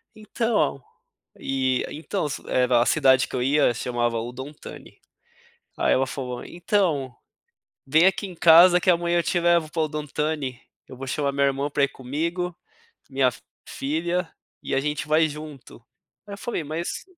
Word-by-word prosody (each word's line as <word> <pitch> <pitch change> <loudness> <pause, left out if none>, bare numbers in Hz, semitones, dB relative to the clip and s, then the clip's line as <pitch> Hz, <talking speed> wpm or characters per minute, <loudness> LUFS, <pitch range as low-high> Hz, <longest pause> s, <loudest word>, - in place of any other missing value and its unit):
"Então, 215 - -1 0.6
e 130 -1 0
então." 160 +2 -3 0.2
Era 125 -1 +3
a - - +2
cidade 135 -3 +4
que - - -7
eu 125 - 0
ia 140 -1 +3
chamava 120 -1 -1
Udon 125 +5 -7
Thani. - - -12 0.8
Aí - - +2
ela 135 +1 +2
falou: 125 -2 -5
"Então, 170 -8 -1 0.7
vem 155 +6 +4
aqui 195 +2 0
em 180 - -10
casa 175 +2 +7
que 190 - +1
amanhã 175 0 +2
eu - - 0
te 175 - 0
levo 170 -2 +2
para 165 - -1
Udon 150 -1 -4
Thani, 145 -4 -3 0.3
eu - - -11
vou 135 +1 -7
chamar 140 +1 -1
meu 140 0 +1
irmão 140 +1 -1
para 145 0 0
ir 140 - +3
comigo, 165 +7 -3 0.5
minha 135 -2 +2 0.4
filha, 165 +5 -2 0.3
e - - -3
a 135 - +2
gente 150 +2 -3
vai 155 +1 +3
junto." 150 -5 -10 0.4
Aí 200 - -7
eu - - -11
falei: 235 -5 -3
"Mas, 160 +4 -4
150 Hz, 165 wpm, -24 LUFS, 130-170 Hz, 0.8 s, casa